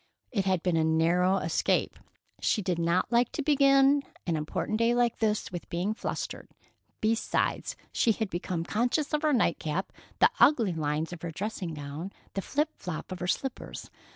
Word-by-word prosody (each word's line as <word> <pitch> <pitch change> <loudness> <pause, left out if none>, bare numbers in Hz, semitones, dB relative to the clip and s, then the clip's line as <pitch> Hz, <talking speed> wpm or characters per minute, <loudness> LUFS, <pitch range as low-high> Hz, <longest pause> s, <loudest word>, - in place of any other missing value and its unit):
It 200 -5 0
had 185 -3 +1
been 180 -3 +2
a 160 - +3
narrow 170 +4 +3
escape. 165 -4 0 0.4
She 210 - +1
did 180 -2 -1
not 170 +6 +1
like 235 0 +3
to 300 - -2
begin 275 -1 +5 0.2
an 170 - 0
important 155 +7 -2
day 230 +1 +3
like 240 -1 +2
this 215 -1 0
with 175 -1 -7
being 180 +5 -1
flustered. - - -5 0.5
Besides, 225 +1 0 0.2
she 230 - +3
had 215 -3 -3
become 175 -1 -2
conscious 245 - 0
of 300 - +2
her 310 -1 +2
night 235 - +2
cap, 165 +5 -3 0.2
the - - +5
ugly 230 - +5
lines 155 +1 -2
of 170 - -9
her 170 - -4
dressing 180 -1 -4
gown, 145 +6 -6 0.2
the 195 - -2
flop 300 - 0
flop 180 -1 -6
of 185 - -5
her 180 - -3
slippers. 265 +7 -3
190 Hz, 180 wpm, -29 LUFS, 170-240 Hz, 0.5 s, begin